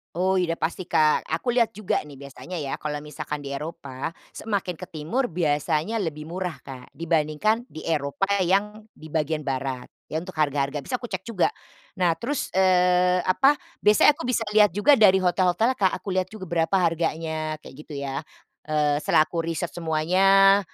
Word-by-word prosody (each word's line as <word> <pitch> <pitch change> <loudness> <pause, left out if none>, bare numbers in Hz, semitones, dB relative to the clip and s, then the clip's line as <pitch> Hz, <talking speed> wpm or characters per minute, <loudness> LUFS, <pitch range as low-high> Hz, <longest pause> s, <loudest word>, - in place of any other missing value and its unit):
Oh 185 +1 +2
iya 165 -2 0
udah - - -31
pasti 175 +2 -2
Kak. 155 -1 +2
Aku 170 +10 -1
lihat 235 -4 +1
juga 210 -2 -1
nih 145 - -11
biasanya 140 +6 -9
ya, 145 -5 -4
kalau 150 -1 -4
misalkan 150 -1 -6
di 140 - -6
Eropa 140 0 -6 0.2
semakin 195 -6 -3
ke 185 - -7
timur 185 - -2
biasanya 160 +5 0
lebih 155 -5 -3
murah 175 +1 -4
Kak 130 -2 -10
dibandingkan 165 - 0
di 155 - -10
Eropa 155 +3 -2 0.2
yang 200 +4 +1 0.2
di 155 -1 -12
bagian 155 -1 -1
barat. 130 -1 -3 0.2
Iya 160 +2 -3
untuk 185 - -8
harga-harga 145 -1 0
biasa 250 - -4
aku 240 -1 -7
cek 190 -1 -3
juga. 230 - +1 0.5
Nah, 175 -2 +4
terus, 280 +4 -2
eee, 180 -1 +4
apa, 270 +10 +4 0.3
biasanya 210 +7 +6
aku 325 - -7
bisa 240 -2 +1
lihat 210 -1 +7
juga 240 - +5
dari 195 -5 +6
hotel-hotelnya 185 +6 +2
Kak. 190 -4 +2
Aku - - -19
lihat 185 0 +1
juga 215 -3 -9
berapa 165 +2 +1
harganya, 160 -2 -1
kayak - - -12
gitu 150 - -9
ya. 140 0 -3 0.5
Eee, 150 -1 +1
setelah 155 - +4
aku 170 - -4
riset 165 +1 -3
semuanya, 190 +5 +4
170 Hz, 175 wpm, -25 LUFS, 150-195 Hz, 0.5 s, lihat